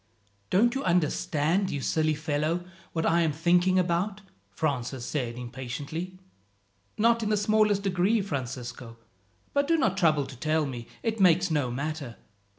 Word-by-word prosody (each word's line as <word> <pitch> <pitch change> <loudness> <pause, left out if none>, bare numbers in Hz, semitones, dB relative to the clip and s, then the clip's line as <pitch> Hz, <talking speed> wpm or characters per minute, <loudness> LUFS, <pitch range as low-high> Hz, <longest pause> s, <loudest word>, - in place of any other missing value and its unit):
"Don't 235 +6 +3
you 270 - -2
understand, 175 +1 +1
you 145 - -2
silly 155 +3 +1
fellow, 155 +3 -1 0.3
what 165 -1 -1
I 170 +1 +3
am 160 -2 +2
thinking 175 +4 +3
about?" 185 +3 0 0.3
Francis 130 -4 -2
said 120 -5 -3
impatiently. 135 +9 -6 0.8
"Not 230 +2 +3
in 215 - -1
the 210 - +2
smallest 210 -1 +2
degree, 195 +3 +2
Francisco; 125 -7 -5 0.6
but 280 0 +2
do 330 +1 +3
not 215 - +1
trouble 155 -6 +3
to 130 - -10
tell 155 +4 0
me 120 -4 -6 0.2
it 225 -1 -1
makes 180 -1 +4
no 145 -5 +1
matter. 140 -1 -4
165 Hz, 150 wpm, -27 LUFS, 140-195 Hz, 0.8 s, makes